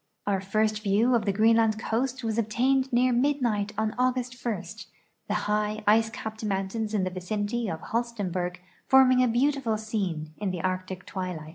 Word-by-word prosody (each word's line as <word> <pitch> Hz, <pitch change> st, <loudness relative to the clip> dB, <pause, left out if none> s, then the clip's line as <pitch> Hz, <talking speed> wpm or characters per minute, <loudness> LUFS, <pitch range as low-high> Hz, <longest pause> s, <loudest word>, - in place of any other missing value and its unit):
Our 195 Hz, -2 st, 0 dB
first 215 Hz, +2 st, 0 dB
view 215 Hz, +4 st, +2 dB
of 230 Hz, -3 st, +2 dB
the 200 Hz, -, +2 dB
Greenland 220 Hz, +1 st, +3 dB
coast 250 Hz, +4 st, -2 dB
was 225 Hz, 0 st, -1 dB
obtained 260 Hz, +5 st, +1 dB
near 250 Hz, +1 st, +3 dB
mid 280 Hz, +4 st, +2 dB
night 210 Hz, -5 st, 0 dB
on 220 Hz, 0 st, 0 dB
August 255 Hz, 0 st, -1 dB
1, 215 Hz, -7 st, -2 dB, 0.6 s
the 205 Hz, -, -1 dB
high, 210 Hz, +1 st, -1 dB
ice 225 Hz, +2 st, +4 dB
cajiped 220 Hz, 0 st, -7 dB
mountains 210 Hz, +2 st, -2 dB
in 195 Hz, -, +1 dB
the 185 Hz, -, -1 dB
vicinity 205 Hz, +5 st, -2 dB
of 160 Hz, -2 st, -5 dB
Holstenborg 195 Hz, -7 st, -2 dB, 0.3 s
forming 255 Hz, -1 st, +6 dB
a -, -, +3 dB
beautiful 245 Hz, -1 st, +1 dB
scene 190 Hz, -8 st, -3 dB
in 205 Hz, -2 st, -2 dB
the 180 Hz, -3 st, -4 dB
Arctic 185 Hz, 0 st, -3 dB
twilight. 180 Hz, -5 st, -5 dB
215 Hz, 170 wpm, -27 LUFS, 195-240 Hz, 0.6 s, forming